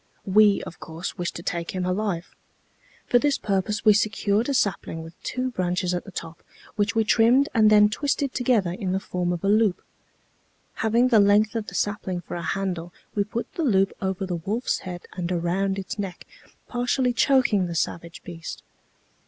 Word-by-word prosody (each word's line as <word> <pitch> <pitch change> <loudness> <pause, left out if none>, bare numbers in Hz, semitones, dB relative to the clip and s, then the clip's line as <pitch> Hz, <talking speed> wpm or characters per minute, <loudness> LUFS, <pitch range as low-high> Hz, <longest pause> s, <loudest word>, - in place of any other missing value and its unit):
We, 205 +1 +5
of - - -9
course, 165 +2 -6
wished 175 - -2
to 170 - -7
take 170 +1 -3
him 185 -1 -1
alive. 185 -2 -2 0.7
For 245 - +4
this 290 +1 +2
purpose 205 +1 -1
we 215 - +8
secured 210 +2 +1
a - - +1
sapling 175 -7 -1
with 165 +1 -11
two 255 0 -2
branches 180 -3 -1
at 175 - -3
the 195 - -10
top, 165 -2 -7 0.3
which 210 +1 0
we 225 - +3
trimmed 240 +6 +4
and 215 -2 +5
then 210 -1 +7
twisted 280 +4 -1
together 235 -8 +2
in 185 0 -3
the 190 - +1
form 180 -2 -2
of 175 -2 -3
a - - +1
loop. 210 -2 +3 1.0
Having 235 +3 +3
the 225 -4 +6
length 205 +1 +4
of 220 -2 -2
the - - -8
sapling 200 -4 -2
for - - -9
a 175 - -3
handle, 180 -3 -3 0.2
we 205 - +1
put 225 +3 -5
the 340 - -2
loop 195 -8 +3
over 190 0 -2
the 180 -2 -3
wolfs 210 +9 -1
head 180 -1 -7
and 180 -1 -3
around 185 +3 0
its 195 +3 -5
neck, 190 -3 -5 0.4
partially 245 +1 0
choking 240 -7 +3
the 170 - -5
savage 170 +1 -3
beast. 165 -2 -8
200 Hz, 185 wpm, -25 LUFS, 180-225 Hz, 1.0 s, we